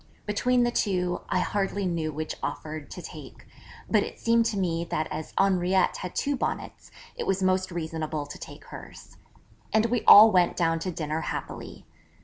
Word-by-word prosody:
Between 245 +4 +2
the 240 - +1
two, 180 -6 0
I - - +1
hardly 200 0 -1
knew 165 -3 -1
which 155 +1 -4
offer 155 0 -4
to 145 - -10
take, - - -11 0.4
but - - +3
it - - -6
seemed 230 0 +3
to 210 - -2
me 170 -3 0
that 155 -2 -2
as 155 0 -5
Henriette 185 -1 +2
had 180 - -7
two 285 0 0
Bonnets, - - -4 0.3
it - - -4
was 195 0 0
most 185 0 +1
reasonable 160 -3 -3
to 145 - -10
take - - -11
hers. - - -12 0.5
And 220 +1 +3
we 235 -1 0
all 215 +2 +10
went 180 -3 +3
down 165 -2 +1
to 185 +3 -3
dinner 155 -1 -3
happily. - - -6
180 Hz, 175 wpm, -27 LUFS, 160-205 Hz, 0.5 s, all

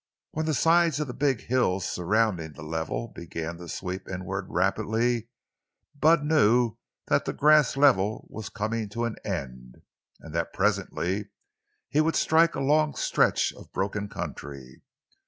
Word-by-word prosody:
When 160 +1 -2
the 155 - +1
sides 165 +1 +3
of 150 - 0
the 125 - -6
big 135 -4 0
hills 100 -7 +1
surrounding 90 -4 0
the 75 - -11
level 80 +8 -3
began 85 -1 -6
to 85 -1 -10
sweep 95 +4 -5
inward 95 +1 -4
rapidly, 110 +5 0 0.7
Bud 155 +1 +4
knew 120 -6 +3 0.3
that - - +2
the - - -2
grass 150 -2 +4
level 110 -7 +3
was 110 -2 -7
coming 110 0 -3
to 115 +3 -2
an 115 - -4
end, 65 -10 -6 0.4
and 80 - -11
that 85 0 -2
presently 100 0 -1 0.6
he 150 - +2
would 165 +1 +1
strike 165 +1 +3
a - - -2
long 150 +2 +2
stretch - - +2
of - - -15
broken 100 +1 -2
country. 65 -7 -8
105 Hz, 150 wpm, -27 LUFS, 90-140 Hz, 0.7 s, Bud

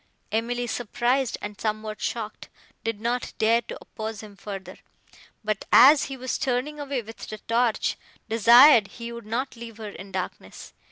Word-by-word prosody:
Emily, 240 +3 -1
surprised 245 +2 0
and 205 0 -7
somewhat 215 -1 -3
shocked, 220 -2 -4 0.3
did 225 -2 -2
not 240 +3 -2
dare 230 +2 +3
to - - -8
oppose 220 -1 -7
him 210 -2 -12
further, 195 -2 -8 0.6
but, 215 -1 -2
as 275 +4 +8
he 270 - -6
was 255 0 -3
turning 265 +4 -1
away 280 -4 -3
with 225 +1 -11
the 215 - -7
torch, 230 +1 0 0.3
desired 230 +1 +7
he 235 +2 -8
would 235 -2 -9
not 255 +5 -2
leave 230 -2 -10
her 215 -2 -6
in 195 0 -10
darkness. 185 -1 -6
230 Hz, 160 wpm, -25 LUFS, 215-245 Hz, 0.6 s, as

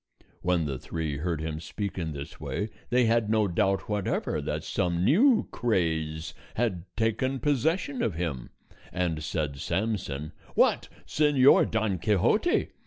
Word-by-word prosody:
When 90 -2 +1
the 70 -3 -3
three 80 -4 -3
heard 80 +1 -2
him 80 -1 -3
speak 100 +5 -5
in 80 -2 -2
this 70 -1 -8
way, 105 +1 -3 0.2
they 125 0 +3
had 115 -1 +2
no 110 -1 +3
doubt 95 +2 0
whatever 105 -2 -1
that - - -3
some 85 0 0
new 225 - +4
craze 80 -8 -1 0.2
had 100 -7 -1
taken 125 +4 0
possession 145 +2 0
of 105 -8 0
him; 80 -7 -3 0.4
and 85 -4 -1
said 75 -3 -2
Samson, 85 -6 -2 0.2
"What! - - +3 0.2
Señor 145 -3 +4
Don 110 -5 0
Quixote! 105 - +2
95 Hz, 140 wpm, -28 LUFS, 80-115 Hz, 0.4 s, new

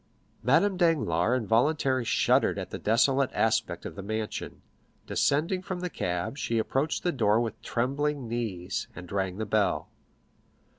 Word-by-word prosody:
Madame 170 - +3
Danglars 130 - +2
involuntarily 130 +3 +1
shuddered - - +3
at - - -5
the - - -5
desolate 130 +5 +3
aspect 110 -6 0
of - - -5
the 100 - -7
mansion; 110 +2 -4 0.4
descending 165 +6 +1
from 185 -1 -5
the 180 -1 -3
cab, 90 +10 -3
she 115 - -1
approached 135 +7 0
the 175 - +2
door 110 -6 +2
with 115 -2 -3
trembling 140 +2 -1
knees, 105 -6 -3
and 90 -1 -9
rang 95 -2 -1
the 110 - -2
bell. 105 -1 0
115 Hz, 145 wpm, -28 LUFS, 105-145 Hz, 0.4 s, Madame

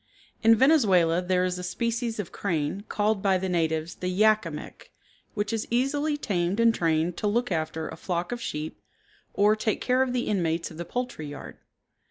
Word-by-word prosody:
In 225 0 +6
Venezuela 195 - +4
there 180 0 +1
is 180 0 -2
a - - -6
species 230 +4 -2
of 200 - -4
crane, 175 +1 -2
called 210 -1 +1
by 195 -1 +3
the 190 +1 -3
natives 160 -2 0
the 180 - -5
Yak 215 +1 +3
a - - -3
Mik, 150 -1 -9 0.4
which 205 +1 -1
is 225 - -2
easily 285 +5 +1
tamed 190 -5 -1
and 230 0 +5
trained 165 -2 0
to 210 - -1
look 235 +2 0
after 160 -1 -2
a - - -7
flock 175 +2 -3
of 240 -1 -4
sheep 155 -5 -5 0.5
or 210 +1 +4
take 215 0 -1
care 255 +1 +2
of 260 -1 +1
the 245 -1 -1
inmates 170 -5 -1
of 160 - -11
the 170 - -5
poultry 245 -11 -4
yard. 145 -1 -9
195 Hz, 195 wpm, -26 LUFS, 170-230 Hz, 0.5 s, In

